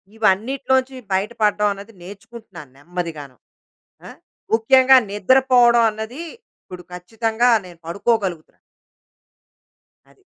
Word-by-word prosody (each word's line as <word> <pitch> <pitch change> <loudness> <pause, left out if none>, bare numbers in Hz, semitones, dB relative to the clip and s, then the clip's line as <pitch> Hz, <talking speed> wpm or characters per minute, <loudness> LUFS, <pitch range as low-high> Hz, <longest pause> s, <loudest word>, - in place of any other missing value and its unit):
ఇవన్నిటిలో 225 +6 0
నుంచి 260 +1 -9 0.2
బయట 195 +4 -1
పడడం 210 0 +2
అనేది 200 +3 -13
నేర్చుకుంటున్నాను 200 - -13
నెమ్మదిగాను. 155 -4 -7 0.7
ఆ! - - -9 0.5
ముఖ్యంగా 260 +3 +5
నిద్ర 205 +6 +2
పోవడం 240 -1 +5
అన్నది 220 +6 -8 0.4
ఇప్పుడు 180 -1 -11
ఖచ్చితంగా 225 +6 -1 0.2
నేను 175 -2 -14
పడుకోగలుగుతున్నాను. 190 -2 -2 1.5
అది. 395 - -27
215 Hz, 100 wpm, -20 LUFS, 180-235 Hz, 1.5 s, ముఖ్యంగా